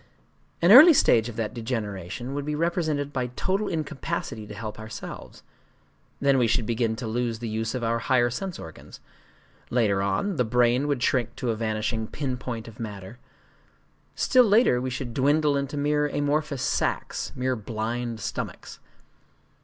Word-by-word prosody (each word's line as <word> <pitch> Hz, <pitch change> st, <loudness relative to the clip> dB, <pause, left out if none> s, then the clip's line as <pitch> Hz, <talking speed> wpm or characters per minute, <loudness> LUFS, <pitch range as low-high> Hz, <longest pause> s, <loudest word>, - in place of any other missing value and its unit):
An 175 Hz, -, +6 dB
early 305 Hz, +9 st, +11 dB
stage 115 Hz, -, +4 dB
of 115 Hz, -, -8 dB
that 110 Hz, -2 st, -3 dB
degeneration 110 Hz, 0 st, -4 dB
would 145 Hz, 0 st, -3 dB
be 150 Hz, +1 st, -2 dB
represented 155 Hz, -3 st, -1 dB
by 125 Hz, -2 st, -1 dB
total 195 Hz, +7 st, -1 dB
incapacity 145 Hz, -8 st, -4 dB
to 105 Hz, -, -8 dB
help 105 Hz, -1 st, -6 dB
ourselves;—then 135 Hz, +4 st, -5 dB
we 120 Hz, -, +3 dB
should 115 Hz, 0 st, +1 dB
begin 115 Hz, 0 st, 0 dB
to 115 Hz, +2 st, -6 dB
lose 115 Hz, +1 st, -1 dB
the 115 Hz, +1 st, -5 dB
use 110 Hz, +2 st, -2 dB
of 125 Hz, -, -3 dB
our 115 Hz, 0 st, 0 dB
higher 120 Hz, 0 st, +2 dB
sense 185 Hz, +8 st, -4 dB
organs;—later 100 Hz, +5 st, -5 dB
on, 100 Hz, -, -1 dB
the 125 Hz, -, +3 dB
brain 125 Hz, +3 st, +2 dB
would 140 Hz, -4 st, -1 dB
shrink 120 Hz, -4 st, +1 dB
to 120 Hz, -, -1 dB
a -, -, -2 dB
vanishing 110 Hz, 0 st, -2 dB
pin 135 Hz, -1 st, -3 dB
point 115 Hz, -3 st, -6 dB
of 110 Hz, -1 st, -12 dB
matter;—still 105 Hz, 0 st, -7 dB, 1.2 s
later 215 Hz, -, +4 dB
we 130 Hz, -, -2 dB
should 125 Hz, -2 st, -5 dB
dwindle 145 Hz, +3 st, +2 dB
into 140 Hz, +1 st, -2 dB
mere 150 Hz, +1 st, +1 dB
amorphous 145 Hz, -1 st, -1 dB
sacs, -, -, -1 dB
mere 130 Hz, 0 st, 0 dB
blind 115 Hz, +1 st, -4 dB
stomachs. -, -, -6 dB
125 Hz, 155 wpm, -26 LUFS, 110-145 Hz, 1.2 s, early